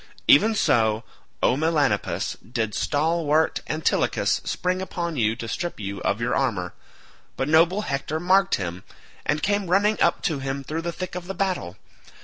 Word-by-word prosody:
Even 215 +9 +6
so, 110 - +2 0.4
O - - +4
Melanippus, 150 -8 0
did 110 0 -3
stalwart 160 +1 +1
Antilochus 155 0 +1
spring 180 +1 -1
upon 170 -3 -3
you 110 -4 +1
to 115 - -6
strip 175 +7 -4
you 100 -1 -5
of 100 - 0
your 120 +1 -1
armour; 100 -10 -1 0.6
but 135 - -1
noble 165 +6 +4
Hector 145 -2 -3
marked 190 +3 +3
him, 90 -1 -5 0.4
and 150 +1 0
came 205 -1 +1
running 205 +4 +2
up - - +2
to 160 -7 0
him 135 +1 -3
through 155 +4 -4
the 170 +1 -3
thick 185 +1 -6
of 180 0 -6
the 195 - -5
battle. 180 - -2
155 Hz, 160 wpm, -24 LUFS, 115-180 Hz, 0.6 s, Even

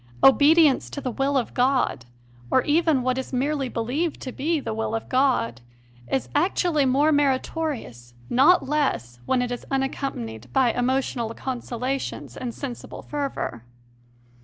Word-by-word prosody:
Obedience 295 +1 +6
to - - -6
the 260 -3 -3
will 275 +3 0
of 250 - -2
God 250 - +1 0.4
or 260 - +3
even 310 -3 +2
what 255 +1 0
is 260 - -6
merely 275 +1 -1
believed 265 +9 -2
to 255 - -5
be 315 +5 -1
the 260 - -4
will 225 0 -2
of 225 - -4
God 255 - +1 0.5
is 270 - 0
actually 320 -2 +2
more 285 +4 +3
meritorious, 270 - -1
not 275 +6 +4
less, 260 - -1
when 255 -1 +2
it 245 - -3
is 245 - -4
un 270 -1 +1
accompanied 120 - -5
by 245 -3 +3
emotional 245 -2 -1
consolations 255 +1 -4
and 250 -2 -4
sensible 250 0 -7
fervour. 275 - -4
265 Hz, 145 wpm, -24 LUFS, 240-285 Hz, 0.5 s, Obedience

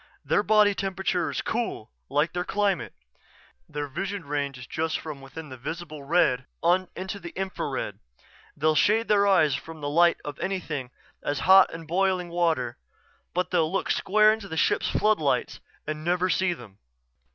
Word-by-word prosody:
Their - - +3
body 210 -1 +4
temperature 190 -2 -1
is - - -2
cool, 225 - -3 0.2
like 145 +4 +1
their 175 0 -1
climate. 200 -2 -1 0.7
Their 150 -1 -4
vision 190 +5 -4
range 140 -2 -2
is 125 - -9 0.3
from 155 -3 -5
just - - -15
within 145 +3 -9
the 130 - -8
visible 155 +3 -6
red 140 -5 +2 0.2
on 180 +2 +3
into 190 +2 -5
the 175 -2 -7
infrared. 190 0 -3 0.6
They'll 155 +1 +3
shade 220 +8 +3
their 200 -1 +4
eyes 155 -7 +4
from 160 +3 -6
the 145 -1 -3
light 170 +3 +4
of 145 -1 -6
anything 160 -9 -3 0.3
as 145 -1 -2
hot 190 +1 +7
as 165 0 -8
boiling 180 +1 0
water 165 -8 0 0.6
but 180 0 0
they'll 165 -3 +2
look 195 - 0
square 215 +2 +4
into 220 -2 -6
the 160 - -5
ship's - - +2
floodlights 210 -10 +1 0.3
and 155 0 -4
never 180 +2 +1
see 190 -1 +2
them." 110 - -13
175 Hz, 165 wpm, -26 LUFS, 150-190 Hz, 0.7 s, hot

